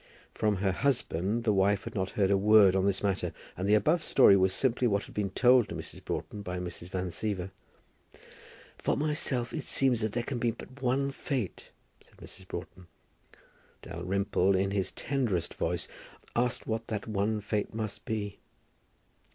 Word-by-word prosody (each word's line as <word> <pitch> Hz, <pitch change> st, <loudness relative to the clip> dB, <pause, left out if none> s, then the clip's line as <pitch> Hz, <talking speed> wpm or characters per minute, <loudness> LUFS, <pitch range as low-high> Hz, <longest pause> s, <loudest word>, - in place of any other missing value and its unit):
From 105 Hz, -1 st, +1 dB
her 95 Hz, 0 st, +1 dB
husband 115 Hz, -3 st, 0 dB
the 110 Hz, -3 st, +2 dB
wife 100 Hz, +1 st, +2 dB
had -, -, -7 dB
not 95 Hz, -2 st, -1 dB
heard 100 Hz, -2 st, +1 dB
a -, -, +5 dB
word 105 Hz, -2 st, +6 dB
on 95 Hz, +1 st, +2 dB
this 100 Hz, 0 st, 0 dB
matter, 100 Hz, -2 st, 0 dB, 0.2 s
and 95 Hz, +3 st, -2 dB
the 105 Hz, -, +6 dB
above 155 Hz, -, +3 dB
story 125 Hz, -10 st, +6 dB
was 95 Hz, -1 st, +3 dB
simply 125 Hz, +2 st, +1 dB
what 100 Hz, -2 st, +1 dB
had -, -, -13 dB
been 105 Hz, -2 st, -1 dB
told 125 Hz, +4 st, +4 dB
to -, -, -5 dB
Mrs. -, -, -7 dB
Broughton 105 Hz, -, -4 dB
by 90 Hz, -2 st, -4 dB
Mrs. 90 Hz, -1 st, -6 dB
Van 90 Hz, 0 st, -2 dB
Siever. 95 Hz, -2 st, -3 dB, 1.3 s
"For -, -, 0 dB
myself 145 Hz, -5 st, 0 dB
it -, -, -4 dB
seems 130 Hz, -4 st, +2 dB
that 110 Hz, -1 st, -1 dB
there 120 Hz, -, -1 dB
can 125 Hz, 0 st, -3 dB
be 120 Hz, -, +1 dB
but 130 Hz, +4 st, -9 dB
one 135 Hz, +2 st, +1 dB
fate," 135 Hz, -, -4 dB, 0.3 s
said -, -, -24 dB
Mrs. 95 Hz, -1 st, -12 dB
Broughton. 90 Hz, 0 st, -8 dB, 1.0 s
Dalrymple, 95 Hz, +2 st, 0 dB
in 95 Hz, +1 st, +1 dB
his 100 Hz, -2 st, -1 dB
tenderest 120 Hz, -, -1 dB
voice, 85 Hz, 0 st, -2 dB, 0.5 s
asked 120 Hz, 0 st, 0 dB
what 115 Hz, 0 st, -3 dB
that 105 Hz, -2 st, -3 dB
one 105 Hz, +1 st, 0 dB
fate 105 Hz, 0 st, -2 dB
must 110 Hz, -1 st, -4 dB
be. 105 Hz, -2 st, -3 dB
105 Hz, 175 wpm, -30 LUFS, 95-120 Hz, 1.3 s, word